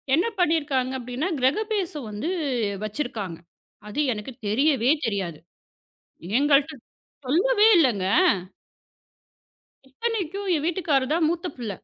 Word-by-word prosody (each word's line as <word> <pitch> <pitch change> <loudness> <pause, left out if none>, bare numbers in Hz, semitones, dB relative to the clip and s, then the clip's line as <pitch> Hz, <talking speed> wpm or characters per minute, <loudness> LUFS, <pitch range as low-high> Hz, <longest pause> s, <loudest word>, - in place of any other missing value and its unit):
என்ன 350 +8 +2
பண்ணிருக்காங்க 290 -6 +1
அப்டின்னா, 250 +9 -3
கிரகபிரவேசம் 335 - -1
வந்து 215 +11 -3 0.6
வச்சிருக்காங்க. 215 - -4 0.5
அது 255 +8 -5
எனக்குத் 230 +3 -9
தெரியவே 265 +1 +3 0.2
தெரியாது. 190 -7 -3 1.0
எங்கள்ட்ட 290 +1 +3 0.5
சொல்லவே 415 - +4
இல்லங்க. 235 - +2 1.8
இத்தனைக்கும் 400 - -3
என் 295 - -3
வீட்டுக்காரர் 305 -6 +1
தான் 330 -1 +2
மூத்த 340 +1 -2
புள்ள. 230 -4 -5
285 Hz, 95 wpm, -24 LUFS, 245-340 Hz, 1.8 s, சொல்லவே